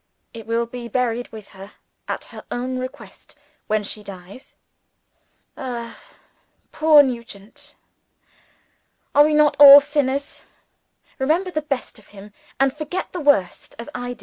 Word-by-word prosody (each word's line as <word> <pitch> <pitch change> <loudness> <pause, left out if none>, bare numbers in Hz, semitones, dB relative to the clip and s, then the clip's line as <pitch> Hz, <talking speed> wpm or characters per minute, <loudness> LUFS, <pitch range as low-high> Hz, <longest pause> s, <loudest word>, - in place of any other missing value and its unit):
It 225 -2 -11
will 230 +1 0
be 235 0 -8
buried 245 0 -2
with 215 -2 -11
her, 195 +1 -13 0.3
at - - -4
her - - -10
own 255 +1 -4
request, 255 0 -10 0.3
when 215 0 0
she 210 +1 -5
dies. 195 +3 -13 1.0
Ah, 240 -3 -6 0.8
poor 310 -2 +6
Nugent! 235 -5 -8 1.4
Are 290 - +7
we 305 0 +1
not 300 -1 +4
all 285 0 +11
sinners? 285 -1 -2 0.8
Remember 330 +8 0
the 310 - -2
best 275 -6 -5
of 210 - -21
him, 205 0 -14 0.3
and 270 0 +2
forget 305 +4 -5
the 360 - -4
worst, 280 -11 0
as 235 +5 -9
I 245 0 -5
do. - - -19
250 Hz, 140 wpm, -21 LUFS, 225-290 Hz, 1.4 s, all